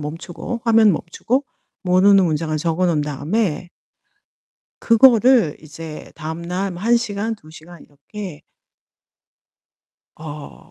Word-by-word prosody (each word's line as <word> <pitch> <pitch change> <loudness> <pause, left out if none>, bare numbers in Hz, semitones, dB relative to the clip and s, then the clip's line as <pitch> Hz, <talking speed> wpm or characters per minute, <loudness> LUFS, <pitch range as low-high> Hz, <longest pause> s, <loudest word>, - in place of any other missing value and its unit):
멈추고, 165 +9 -6
화면 225 -2 +5
멈추고 225 - -2 0.4
모르는 190 +2 +5
문장을 155 -1 -1
적어 165 +3 0
놓은 160 -4 +1
다음에 155 +5 -2 1.1
그거를 235 - +5
이제 155 0 -10
다음날 170 +5 -4
뭐 175 +1 -9
1 235 +2 +4
시간, 220 -1 -2
2 155 -7 -18
시간 165 +1 -14
이렇게 155 +3 -10 1.7
어 145 - -10
175 Hz, 215 characters per minute, -20 LUFS, 155-215 Hz, 1.7 s, 화면